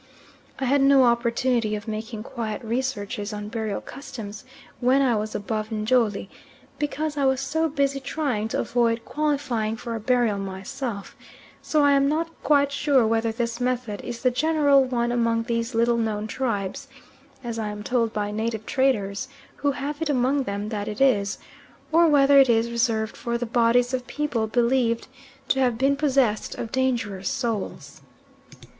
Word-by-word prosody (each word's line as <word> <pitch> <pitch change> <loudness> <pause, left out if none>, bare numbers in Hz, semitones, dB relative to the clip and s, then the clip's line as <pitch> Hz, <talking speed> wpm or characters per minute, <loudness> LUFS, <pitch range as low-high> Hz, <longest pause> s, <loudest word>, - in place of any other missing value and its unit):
I 265 - -2
had 275 +2 +3
no 275 -1 +6
opportunity 235 -1 +1
of 210 +2 -7
making 220 0 -5
quiet 225 -2 -5
researches 230 -3 -3
on 210 0 -5
burial 220 -2 -3
customs 220 -6 -8 0.4
when 255 +2 +3
I 260 -4 +3
was 215 0 -3
above 215 +1 -3
Njoli, 220 -2 +1 0.5
because 295 0 -2
I 280 - +2
was 265 -1 +2
so 320 +4 0
busy 280 -1 0
trying 270 -6 -2
to - - -2
avoid 230 -1 0
qualifying 280 -8 -1
for 235 +1 -5
a 225 - -3
burial 230 -2 +1
myself; 195 +3 -5 0.5
so 305 -1 +1
I 285 - +5
am 275 0 +4
not 330 +2 -1
quite 285 -1 +3
sure 280 -3 +3
whether 225 0 +1
this 235 +1 -3
method 245 -4 -2
is 240 0 -6
the 255 - +4
general 285 0 +4
one 240 -2 -1
among 230 -1 +1
these 230 0 -2
little 235 +1 +3
known 215 -2 -1
tribes, 230 +1 -3 0.6
as 230 -1 -4
I 215 - -2
am 210 0 -6
told 230 -1 +1
by 210 -1 -2
native 220 0 -3
traders, 260 -4 0 0.3
who 285 -1 0
have 290 +3 -5
it 325 - -1
among 270 0 +1
them 200 +1 -3
that 210 -2 -3
it 210 0 -5
is 210 -7 +2 0.5
or 335 +1 +5
whether 280 -2 +6
it 270 -2 +6
is 230 0 +2
reserved 225 -2 0
for 235 0 -2
the 240 - -3
bodies 240 +2 +2
of 250 0 -2
people 290 -7 -1
believed 235 0 +1 0.4
to 265 - +2
have 250 -3 +2
been 275 +3 +2
possessed 270 -7 +1
of 230 - -5
dangerous 230 -7 -1
souls. 225 -5 -4
235 Hz, 165 wpm, -24 LUFS, 220-270 Hz, 0.6 s, no